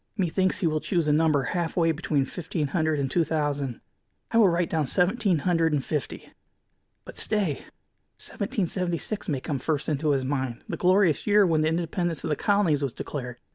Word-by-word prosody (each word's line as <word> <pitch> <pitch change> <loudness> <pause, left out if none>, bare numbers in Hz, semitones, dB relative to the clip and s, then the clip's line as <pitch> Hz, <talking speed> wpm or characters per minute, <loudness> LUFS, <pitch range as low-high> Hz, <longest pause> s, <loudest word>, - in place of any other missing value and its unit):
Methinks 185 0 0
he - - +1
will 155 -1 +1
choose 170 -1 -1
a 150 - +3
number 155 -2 +3
half 170 +5 -2
way 165 -1 +3
between 150 -3 0
fifteen 160 -2 -4
hundred 155 -1 0
and 135 -2 -1
two 170 - +3
thousand. 145 -5 -2 0.5
I 230 - +3
will 205 -4 +6
write 170 0 0
down 155 -4 0
seventeen 190 - +2
hundred 165 0 +1
and 140 -3 0
fifty. 150 -3 -4 0.7
But, - - -3
stay! 200 -10 0 0.5
Seventeen 200 -1 -3
seventy 175 0 -2
six 210 +3 -5
may 140 -4 -1
come 145 -2 -3
first 145 +2 -2
into 150 0 0
his 135 -2 +1
mind, 130 -3 -3
the - - -3
glorious 185 -3 +2
year 205 -1 +5
when 160 -3 +2
the 155 - +2
independence 170 0 -2
of 160 - -2
the - - +2
colonies 190 -6 +2
was 135 -4 -2
declared. 125 -4 -6
160 Hz, 195 wpm, -26 LUFS, 145-180 Hz, 0.7 s, will